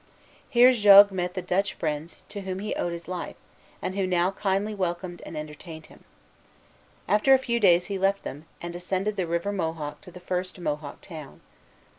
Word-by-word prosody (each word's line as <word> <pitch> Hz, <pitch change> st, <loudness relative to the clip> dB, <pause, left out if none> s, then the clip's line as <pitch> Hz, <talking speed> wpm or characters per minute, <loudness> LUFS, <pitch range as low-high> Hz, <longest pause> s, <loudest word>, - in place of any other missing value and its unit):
Here 245 Hz, +1 st, +7 dB
Jogues 205 Hz, -3 st, +8 dB
met 180 Hz, -1 st, -3 dB
the 185 Hz, -, -3 dB
Dutch 185 Hz, +3 st, 0 dB
friends 155 Hz, +1 st, -4 dB
to 205 Hz, -, -6 dB
whom 190 Hz, -1 st, -4 dB
he 210 Hz, +2 st, -3 dB
owed 175 Hz, -, -2 dB
his 170 Hz, 0 st, -7 dB
life, 180 Hz, -1 st, -5 dB, 0.5 s
and 185 Hz, -, -2 dB
who 195 Hz, -2 st, 0 dB
now 180 Hz, 0 st, +2 dB
kindly 195 Hz, +2 st, -1 dB
welcomed 175 Hz, -2 st, -3 dB
and 155 Hz, -, -7 dB
entertained 155 Hz, +1 st, -8 dB
him. -, -, -20 dB, 1.0 s
After 210 Hz, +7 st, +5 dB
a -, -, +5 dB
few 235 Hz, -2 st, -1 dB
days 180 Hz, -4 st, +5 dB
he 195 Hz, -2 st, -4 dB
left 195 Hz, +1 st, +1 dB
them, 145 Hz, +3 st, -7 dB, 0.2 s
and 175 Hz, 0 st, -5 dB
ascended 190 Hz, +4 st, -2 dB
the 185 Hz, -4 st, -2 dB
River 170 Hz, +4 st, -1 dB
Mohawk 160 Hz, -5 st, -4 dB
to -, -, -13 dB
the 180 Hz, -, -11 dB
first 180 Hz, +1 st, -3 dB
Mohawk 150 Hz, -3 st, -4 dB
town. 155 Hz, -6 st, -10 dB
185 Hz, 185 wpm, -26 LUFS, 170-200 Hz, 1.0 s, Jogues